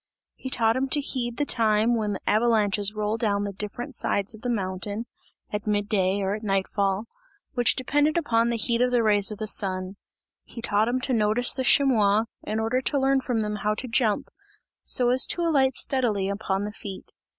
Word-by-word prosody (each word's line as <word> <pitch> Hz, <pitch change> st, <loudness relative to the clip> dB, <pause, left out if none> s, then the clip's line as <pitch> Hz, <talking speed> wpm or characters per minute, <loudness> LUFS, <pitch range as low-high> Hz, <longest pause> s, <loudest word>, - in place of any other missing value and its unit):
He 260 Hz, -, -8 dB
taught 225 Hz, -3 st, +2 dB
him 265 Hz, +1 st, -1 dB
to 290 Hz, -, +2 dB
heed 245 Hz, -4 st, -3 dB
the 290 Hz, -, 0 dB
time 225 Hz, -1 st, +2 dB
when 210 Hz, -2 st, -1 dB
the 195 Hz, -, -6 dB
avalanches 210 Hz, -2 st, +2 dB
roll 215 Hz, +1 st, -1 dB
down 205 Hz, -3 st, 0 dB
the 200 Hz, -1 st, -4 dB
different 210 Hz, +7 st, -5 dB
sides 200 Hz, -2 st, -1 dB
of 220 Hz, -, -12 dB
the 245 Hz, -, -3 dB
mountain 200 Hz, 0 st, -3 dB, 0.5 s
at 210 Hz, 0 st, -4 dB
mid 205 Hz, -1 st, 0 dB
day 195 Hz, -1 st, 0 dB
or 195 Hz, +1 st, -1 dB
at 210 Hz, -, -5 dB
night 195 Hz, -3 st, 0 dB
fall 200 Hz, +1 st, -1 dB, 0.5 s
which 245 Hz, -2 st, +3 dB
depended 290 Hz, +4 st, +1 dB
upon 235 Hz, -8 st, +1 dB
the 235 Hz, -, -1 dB
heat 235 Hz, +1 st, 0 dB
of 250 Hz, -, +3 dB
the 245 Hz, -2 st, +2 dB
rays 205 Hz, -2 st, +3 dB
of 210 Hz, -, -5 dB
the 215 Hz, -, -4 dB
sun. 190 Hz, -2 st, 0 dB, 0.5 s
He -, -, -10 dB
taught 215 Hz, -1 st, +1 dB
him 250 Hz, +2 st, -1 dB
to 265 Hz, 0 st, -1 dB
notice 220 Hz, +2 st, +2 dB
the 260 Hz, -, -2 dB
chamois, 220 Hz, -7 st, +4 dB, 0.2 s
in 215 Hz, +1 st, -3 dB
order 225 Hz, +4 st, 0 dB
to 280 Hz, +2 st, 0 dB
learn 270 Hz, 0 st, +2 dB
from 245 Hz, -3 st, -1 dB
them 210 Hz, 0 st, -3 dB
how 210 Hz, 0 st, -1 dB
to 255 Hz, -, -4 dB
jump, 225 Hz, -3 st, 0 dB, 0.5 s
so 245 Hz, -1 st, +2 dB
as 255 Hz, +1 st, +4 dB
to 345 Hz, -, 0 dB
alight 270 Hz, -6 st, +2 dB
steadily 220 Hz, -8 st, 0 dB
upon 200 Hz, -1 st, -2 dB
the 210 Hz, -, -4 dB
feet. 200 Hz, -3 st, -9 dB
220 Hz, 205 wpm, -25 LUFS, 205-250 Hz, 0.5 s, chamois